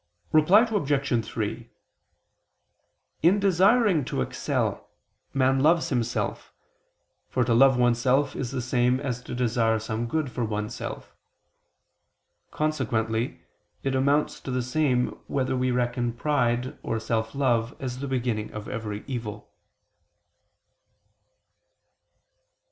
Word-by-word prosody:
Reply 165 Hz, +8 st, +6 dB
Obj. 145 Hz, -, 0 dB
3: 115 Hz, +2 st, -4 dB, 1.5 s
In 180 Hz, +6 st, +4 dB
desiring 195 Hz, -, +4 dB
to 65 Hz, -, -1 dB
excel, -, -, -2 dB, 0.4 s
man 135 Hz, 0 st, +2 dB
loves 160 Hz, +4 st, +3 dB
himself, 120 Hz, -3 st, -2 dB, 0.8 s
for 125 Hz, -, +1 dB
to 120 Hz, 0 st, +1 dB
love 130 Hz, +2 st, +6 dB
oneself 125 Hz, +3 st, +2 dB
is 125 Hz, -, -3 dB
the 130 Hz, -1 st, -3 dB
same 125 Hz, 0 st, +2 dB
as 125 Hz, -4 st, -3 dB
to 125 Hz, -, -7 dB
desire 115 Hz, -2 st, +1 dB
some 110 Hz, +2 st, -3 dB
good 155 Hz, 0 st, -1 dB
for 120 Hz, -, -2 dB
oneself. 105 Hz, -1 st, -5 dB, 1.4 s
Consequently 115 Hz, -6 st, -1 dB, 0.4 s
it 135 Hz, -, 0 dB
amounts 140 Hz, +3 st, +1 dB
to -, -, -8 dB
the 125 Hz, -1 st, -1 dB
same 125 Hz, -1 st, +1 dB, 0.2 s
whether 130 Hz, -1 st, -1 dB
we 130 Hz, 0 st, +1 dB
reckon 120 Hz, -1 st, 0 dB
pride 125 Hz, -2 st, 0 dB
or 115 Hz, -, -2 dB
self 110 Hz, +1 st, -2 dB
love 125 Hz, -3 st, +1 dB
as 130 Hz, -3 st, -4 dB
the 140 Hz, -, -4 dB
beginning 120 Hz, -5 st, -2 dB
of 105 Hz, 0 st, -7 dB
every 105 Hz, -2 st, -5 dB
evil. 115 Hz, -6 st, -6 dB
125 Hz, 115 wpm, -26 LUFS, 115-140 Hz, 1.5 s, Reply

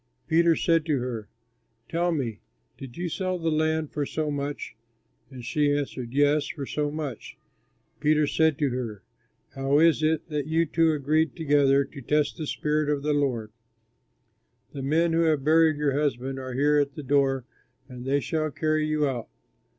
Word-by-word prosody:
Peter 165 Hz, 0 st, +4 dB
said 165 Hz, -1 st, +2 dB
to 155 Hz, -3 st, 0 dB
her, 120 Hz, -4 st, -4 dB, 0.6 s
"Tell 175 Hz, +1 st, 0 dB
me, 120 Hz, -10 st, -2 dB, 0.4 s
did 130 Hz, -3 st, -10 dB
you 175 Hz, +1 st, -2 dB
sell 185 Hz, +2 st, -2 dB
the 165 Hz, -1 st, -1 dB
land 155 Hz, 0 st, 0 dB
for 150 Hz, -, -2 dB
so 150 Hz, +1 st, -2 dB
much?" 145 Hz, -4 st, -4 dB, 0.5 s
And 125 Hz, -3 st, -10 dB
she 145 Hz, +3 st, +1 dB
answered, 130 Hz, -4 st, -4 dB
"Yes, 145 Hz, +2 st, +2 dB
for 140 Hz, -3 st, -5 dB
so 150 Hz, +2 st, -2 dB
much." 145 Hz, -6 st, -6 dB, 0.6 s
Peter 150 Hz, 0 st, +3 dB
said 160 Hz, 0 st, +2 dB
to 145 Hz, -2 st, +1 dB
her, 115 Hz, -5 st, -5 dB, 0.5 s
"How 135 Hz, +1 st, +1 dB
is 160 Hz, -1 st, +4 dB
it 155 Hz, +1 st, +1 dB
that 150 Hz, -2 st, -2 dB
you 165 Hz, +1 st, +2 dB
two 165 Hz, +1 st, +2 dB
agreed 155 Hz, +2 st, +1 dB
together 140 Hz, -3 st, +3 dB
to 140 Hz, 0 st, -11 dB
test 150 Hz, +3 st, 0 dB
the 155 Hz, -, -4 dB
Spirit 150 Hz, 0 st, 0 dB
of 145 Hz, -2 st, 0 dB
the 150 Hz, 0 st, +1 dB
Lord? 125 Hz, -7 st, -1 dB, 1.2 s
The 140 Hz, -, -6 dB
men 165 Hz, +5 st, +1 dB
who 165 Hz, -, +3 dB
have 155 Hz, -4 st, +1 dB
buried 160 Hz, 0 st, +4 dB
your 145 Hz, -2 st, +1 dB
husband 135 Hz, -2 st, -1 dB
are 130 Hz, -1 st, -6 dB
here 145 Hz, +3 st, +3 dB
at 140 Hz, -1 st, -1 dB
the 150 Hz, -, -6 dB
door 135 Hz, -2 st, +1 dB, 0.4 s
and 125 Hz, -2 st, -9 dB
they 140 Hz, +2 st, +1 dB
shall 155 Hz, +4 st, -1 dB
carry 155 Hz, +1 st, 0 dB
you 155 Hz, -1 st, +1 dB
out." 125 Hz, -4 st, -4 dB
145 Hz, 175 wpm, -26 LUFS, 135-155 Hz, 1.2 s, Peter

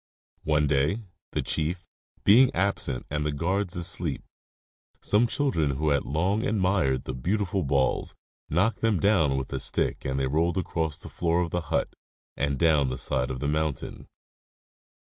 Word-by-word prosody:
One 75 Hz, -1 st, +2 dB
day, 75 Hz, +10 st, +1 dB, 0.3 s
the -, -, -1 dB
chief 85 Hz, +3 st, -2 dB, 0.4 s
being 125 Hz, +5 st, +7 dB
absent 95 Hz, -9 st, -1 dB
and 75 Hz, 0 st, -1 dB
the 75 Hz, -, 0 dB
guards 90 Hz, +5 st, -1 dB
_ -, -, -5 dB
asleep, 85 Hz, -, -2 dB, 0.8 s
some 110 Hz, +4 st, +2 dB
children 80 Hz, -, 0 dB
who 75 Hz, +1 st, +1 dB
had 70 Hz, -1 st, +1 dB
long 95 Hz, +9 st, 0 dB
admired 95 Hz, -, +1 dB
the 65 Hz, -, -5 dB
beautiful 95 Hz, +8 st, -1 dB
balls 70 Hz, -3 st, 0 dB, 0.3 s
knocked 95 Hz, +9 st, +1 dB
them 110 Hz, -5 st, +2 dB
down 80 Hz, -10 st, +3 dB
with 65 Hz, -, -4 dB
a. -, -, -1 dB
stick -, -, -1 dB
and 65 Hz, +1 st, -1 dB
they 65 Hz, -, +1 dB
rolled 80 Hz, +6 st, +1 dB
across 80 Hz, -4 st, -2 dB
the -, -, -11 dB
floor 85 Hz, 0 st, 0 dB
of 85 Hz, -2 st, -2 dB
the 90 Hz, -, -1 dB
hut -, -, -1 dB, 0.4 s
and 70 Hz, -1 st, -1 dB
down 75 Hz, -3 st, +3 dB
the 65 Hz, -, -4 dB
side 65 Hz, -1 st, -1 dB
of 65 Hz, -1 st, -5 dB
the 70 Hz, -, -1 dB
mountain. 75 Hz, -1 st, -2 dB
80 Hz, 165 wpm, -27 LUFS, 70-95 Hz, 0.8 s, being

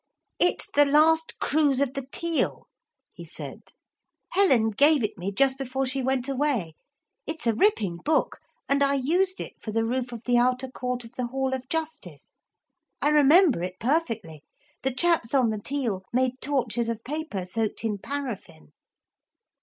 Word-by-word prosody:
'It's 355 Hz, -, +3 dB
The 290 Hz, -, +6 dB
Last 320 Hz, +3 st, +3 dB
Cruise 290 Hz, -3 st, +1 dB
of 275 Hz, -2 st, 0 dB
the 275 Hz, -2 st, -5 dB
Teal,' 335 Hz, -1 st, -1 dB, 0.5 s
he -, -, -10 dB
said. -, -, -8 dB, 0.7 s
'Helen 265 Hz, -, +4 dB
gave 285 Hz, +4 st, +4 dB
it 210 Hz, -, -2 dB
me 190 Hz, +1 st, -4 dB
just 265 Hz, +5 st, +2 dB
before 270 Hz, 0 st, -2 dB
she 265 Hz, +1 st, -1 dB
went 260 Hz, 0 st, 0 dB
away. 265 Hz, -, -1 dB, 0.5 s
It's 315 Hz, -3 st, -4 dB
a 230 Hz, -, +3 dB
ripping 215 Hz, -, +1 dB
book, 300 Hz, -, 0 dB, 0.3 s
and 280 Hz, 0 st, +1 dB
I 280 Hz, 0 st, +3 dB
used 355 Hz, +8 st, 0 dB
it -, -, -7 dB
for 215 Hz, -, -5 dB
the 225 Hz, +1 st, 0 dB
roof 245 Hz, +1 st, -2 dB
of 235 Hz, -1 st, -8 dB
the 245 Hz, -1 st, +3 dB
outer 255 Hz, +1 st, +1 dB
court 250 Hz, -1 st, -4 dB
of 230 Hz, -, -12 dB
the 250 Hz, -1 st, -1 dB
Hall 265 Hz, +1 st, -2 dB
of 260 Hz, -1 st, -5 dB
Justice. 315 Hz, -, -5 dB, 0.6 s
I 295 Hz, -, +2 dB
remember 300 Hz, -, +5 dB
it 180 Hz, +1 st, -4 dB
perfectly. 230 Hz, -, -1 dB, 0.4 s
The 265 Hz, -, 0 dB
chaps 280 Hz, -2 st, +1 dB
on 250 Hz, -4 st, +3 dB
the 215 Hz, -1 st, -4 dB
Teal 235 Hz, -8 st, -2 dB
made 255 Hz, +1 st, 0 dB
torches 240 Hz, -5 st, -1 dB
of 230 Hz, -1 st, -4 dB
paper 290 Hz, -, -4 dB
soaked 220 Hz, +4 st, -3 dB
in 210 Hz, -3 st, -2 dB
paraffin.' 215 Hz, -, -6 dB
260 Hz, 165 wpm, -26 LUFS, 230-290 Hz, 0.7 s, The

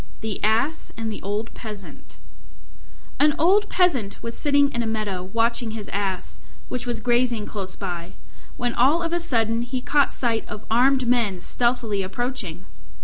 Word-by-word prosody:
THE 220 Hz, -2 st, -4 dB
ASS 230 Hz, +9 st, +1 dB
AND 225 Hz, -1 st, -2 dB
THE 210 Hz, -, -6 dB
OLD 205 Hz, +4 st, -3 dB
PEASANT 210 Hz, -4 st, -9 dB, 1.0 s
An 295 Hz, 0 st, +5 dB
old 400 Hz, +6 st, +4 dB
Peasant 270 Hz, -, +2 dB
was 230 Hz, 0 st, -4 dB
sitting 285 Hz, -1 st, +3 dB
in 235 Hz, -, -1 dB
a 230 Hz, -, -1 dB
meadow 215 Hz, -4 st, -2 dB
watching 225 Hz, +3 st, 0 dB
his 210 Hz, -, -7 dB
Ass, 195 Hz, -2 st, -2 dB, 0.3 s
which 250 Hz, -1 st, -3 dB
was 240 Hz, -, -1 dB
grazing 240 Hz, -3 st, +1 dB
close 195 Hz, -3 st, -4 dB
by, 175 Hz, -2 st, -5 dB, 0.4 s
when 245 Hz, -1 st, -1 dB
all 285 Hz, +9 st, +4 dB
of 335 Hz, 0 st, -2 dB
a 345 Hz, -, +2 dB
sudden 230 Hz, -7 st, +1 dB
he 245 Hz, +2 st, -3 dB
caught 285 Hz, +2 st, +2 dB
sight 230 Hz, -3 st, 0 dB
of 210 Hz, -, -7 dB
armed 255 Hz, +2 st, +4 dB
men 230 Hz, -7 st, +2 dB
stealthily 235 Hz, 0 st, 0 dB
approaching. 195 Hz, -3 st, -3 dB
230 Hz, 160 wpm, -24 LUFS, 210-255 Hz, 1.0 s, An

